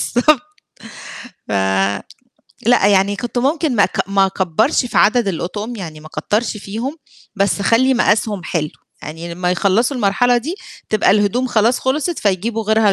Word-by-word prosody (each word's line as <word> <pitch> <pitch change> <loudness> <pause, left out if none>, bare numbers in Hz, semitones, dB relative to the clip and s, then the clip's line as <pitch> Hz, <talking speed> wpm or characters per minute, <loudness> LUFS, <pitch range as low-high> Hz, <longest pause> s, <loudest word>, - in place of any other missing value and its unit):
بالضبط 265 +2 +4 1.1
ف - - -4 1.1
لأ، 240 -5 +4
يعني 200 0 +3
كنت 240 +2 -4
ممكن 285 0 0
ما 200 - +5
أك - - -2
ما 195 -1 +3
أكبرش 190 - 0
في 235 - 0
عدد 230 -1 +3
الأطقم، 205 +7 -4
يعني 160 -6 -8
ما 155 - -13
أكترش 210 +9 -2
فيهم 225 +9 -5 0.4
بس 200 0 0
أخلّي 255 +6 +3
مقاسهم 210 -4 +1
حلو، 155 -4 -2 0.3
يعني 165 +2 -7
لمّا 180 0 -1
يخلصوا 205 +9 +1
المرحلة 245 +3 +2
دي 300 +10 -3 0.3
تبقى 215 -3 +2
الهدوم 210 +5 +2
خلاص 235 +1 +2
خلصت 300 +6 -1
فيجيبوا 215 +3 -1
غيرها 220 -1 +3
215 Hz, 150 wpm, -18 LUFS, 195-245 Hz, 1.1 s, ما